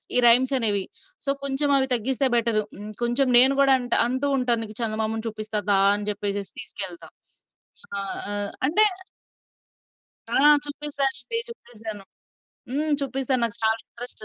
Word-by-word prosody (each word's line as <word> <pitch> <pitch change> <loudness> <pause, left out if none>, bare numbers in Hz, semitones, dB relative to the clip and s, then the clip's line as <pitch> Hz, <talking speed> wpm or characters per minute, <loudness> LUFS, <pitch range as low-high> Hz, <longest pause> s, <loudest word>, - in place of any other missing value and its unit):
ఈ - - +7
రైమ్స్ 250 +3 +5
అనేవి. 205 -5 +2 0.4
సో, - - -3
కొంచెం 280 +1 0
అవి 265 -1 0
తగ్గిస్తే 260 +3 +1
బెటర్. 230 -2 +1 0.2
హ్మ్. 210 +2 -9
కొంచెం 240 +3 0
నేను 260 +3 +8
గూడా 275 -1 +5
అంట 245 -1 -4
అంటూ 260 +3 -2
ఉంటాను, 245 -3 +1
నీకు 215 -1 -8
చందమామను 220 0 -2
చూపిస్తా 215 -1 -3
దా! 200 -1 +4 0.2
అని 205 0 -5
చెప్పేసేసి 200 -2 -4
తీసుకెళ్తా. 185 -4 -4 0.9
ఆ! - - -1 0.3
ఆహ్, 205 0 -2 0.2
అంటే 345 +9 +3 1.5
ఆ! - - +2 0.3
చూపిస్తానండి. 285 - -2
చూపిస్తాను. 220 - -10 0.7
హ్మ్. 300 +3 -2
చూపిస్తాను. 270 -2 -2
నాకు 230 -3 -2
చాలా 220 0 +2
ఇంట్రెస్ట్. 240 -2 -8
240 Hz, 140 wpm, -23 LUFS, 215-270 Hz, 1.5 s, నేను